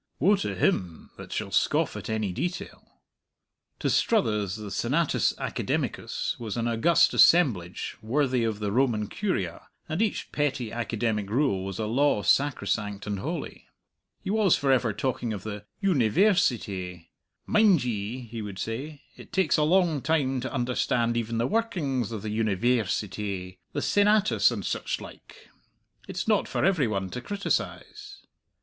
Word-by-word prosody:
Woe 195 +9 +4
to 195 - -3
him 90 - -1
that - - -10
shall - - -3
scoff - - +1
at - - -6
any 110 -4 -1
detail! 175 - -5 0.8
To - - -2
Struthers 105 - +1
the 105 -2 -7
Senatus 145 +10 +1
Academicus - - -2
was 115 -2 -4
an 115 0 0
august 170 +9 +3
assemblage 110 - +3
worthy 125 +2 +1
of 110 -2 -1
the 105 -1 -2
Roman 115 -3 +1
Curia, 100 - -3 0.2
and 160 +6 -2
each 220 - -1
petty 135 -6 -1
academic 115 -3 -2
rule 110 -5 +1
was 95 -1 -5
a 110 - -2
law 120 -1 +2
sacrosanct 105 -4 0
and 105 -2 -3
holy. - - -5 0.6
He - - -2
was 210 -4 +4
for 140 -1 +1
ever 125 -4 +3
talking 120 0 -2
of 100 -3 -6
the 105 -1 -6 0.2
"Univairsity." 120 - +1 0.4
"Mind 210 - +4
ye," 115 +1 -3
he 115 -1 -7
would 100 -2 -7
say, 135 +9 -5
"it - - -14
takes 190 -4 +2
a - - +2
long 165 -2 +3
time 140 -3 +1
to 130 +1 -4
understand 120 -2 0
even 115 0 -2
the 115 - +1
workings 145 - -1
of 110 -3 -5
the 110 - -3
Univairsity 105 -4 -1
the - - -2
Senatus 210 0 +4
and - - -4
such - - -2
like; - - -13 0.6
it's - - -4
not 215 -3 +2
for - - 0
every 180 -9 +3
one 95 -3 -2
to 125 - -5
criticize." 400 - -4
120 Hz, 150 wpm, -27 LUFS, 105-155 Hz, 0.8 s, Woe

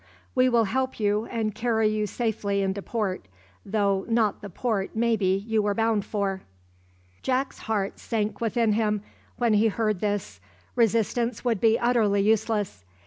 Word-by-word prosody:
We 255 0 +4
will 235 -2 +4
help 260 +5 -1
you, 210 +1 +1
and 220 -3 -2
carry 225 0 +1
you 215 0 0
safely 205 -3 -1
into 195 +1 -1
port, 195 - -3 0.4
though 200 -2 +1
not 225 -3 +1
the 205 - -7
port 205 +1 -2
maybe 210 -4 +1
you 225 -1 +1
were 205 -1 0
bound 225 -2 +1
for." 195 -2 -2 0.8
Jack's 265 +1 -1
heart 205 -3 -2
sank 215 -2 -2
within 230 -1 +2
him 210 -1 0 0.3
when 235 -2 +2
he 210 +2 +4
heard 215 -2 0
this. 205 0 -2 0.4
Resistance 230 +1 +1
would 230 -5 +1
be 225 0 +5
utterly 225 -5 +2
useless. 210 - 0
215 Hz, 150 wpm, -26 LUFS, 205-230 Hz, 0.8 s, be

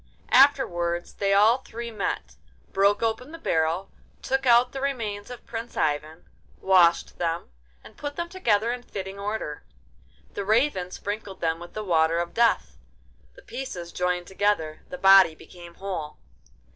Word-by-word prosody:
Afterwards 175 0 +3
they 195 -1 -1
all 215 +5 +5
three 235 -2 -7
met, 210 -3 -3 0.4
broke 200 +2 +3
open 230 +5 -2
the 330 - -8
barrel, 165 - 0 0.3
took 270 0 0
out 240 +1 +5
the 270 - -6
remains 225 -7 -3
of 245 - -10
Prince 230 0 -7
Ivan, 155 +2 -2 0.3
washed 175 -3 +3
them, 165 - -2 0.3
and - - -15
put 290 0 -5
them 340 - -3
together 235 - +1
in 250 - -6
fitting 195 -4 -7
order. 200 -7 -4 0.7
The 200 - -3
Raven 215 -3 +1
sprinkled 205 0 -6
them 165 0 -1
with 175 0 -11
the 215 - -4
Water 165 -3 +2
of 170 0 -2
Death—the 235 - -2
pieces 180 - -6
joined 180 0 -1
together, 190 -6 -1
the 270 - -6
body 195 -6 +7
became 170 +1 -13
whole. 180 -6 -5
200 Hz, 145 wpm, -25 LUFS, 175-235 Hz, 0.7 s, body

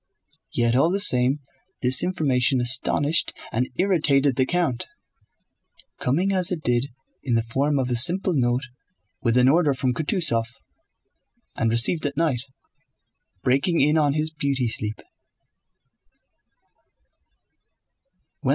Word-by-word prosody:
Yet 120 0 0
all 140 +6 +3
the 195 +3 0
same 130 -5 +3 0.4
this 125 0 +3
information 135 -7 0
astonished 135 +5 +1 0.2
and 125 +3 -1
irritated 145 -7 +2
the 130 0 +1
count, 170 -9 -1 1.1
coming 175 +10 0
as 185 0 0
it 165 -4 -3
did 120 +2 +1 0.3
in 125 -4 -1
the 115 - +1
form 140 +5 -1
of 130 -2 0
a - - +1
simple 175 +9 +2
note 125 0 0 0.6
with 115 0 +1
an 125 0 +4
order 150 -1 +3
from 130 -1 -1
Kutúzov, 155 - 0 1.1
and 115 - 0
received 120 +7 +2
at 140 - -7
night, 155 -7 0 1.0
breaking 140 +7 +1
in 150 +3 +3
on 150 -3 +2
his 155 +1 -1
beauty 140 -5 -2
sleep. 105 -1 -2
135 Hz, 120 wpm, -23 LUFS, 125-160 Hz, 1.1 s, an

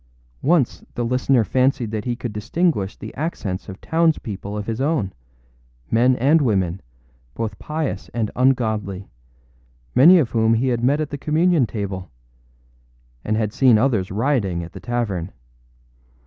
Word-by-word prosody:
Once 155 -4 +1
the 120 - -1
listener 125 0 +2
fancied 125 0 +1
that 110 -2 -3
he 120 -1 -1
could 120 -3 -5
distinguish 105 - -1
the - - -9
accents 105 - -4
of 95 - -8
towns 165 0 +2
people 100 0 -6
of 105 - -4
his 115 +3 -3
own, 140 - 0 0.8
men 125 +3 +4
and 145 +6 +3
women, 95 -7 0 0.5
both 110 -3 -4
pious 155 -1 -4
and 115 -3 -2
ungodly, 110 -7 0 0.9
many 170 +8 +8
of 145 -9 +1
whom 115 0 +3
he 130 +3 +1
had 120 -1 -1
met 140 +4 +3
at 155 -2 -3
the 145 - -5
communion 155 -2 +2
table, 100 -4 -5 1.1
and 110 0 0
had 105 -1 -1
seen 125 -5 +5
others 110 -6 +1
rioting 100 -6 0
at 85 - -9
the - - -8
tavern. 105 -6 -3
115 Hz, 150 wpm, -21 LUFS, 105-135 Hz, 1.1 s, many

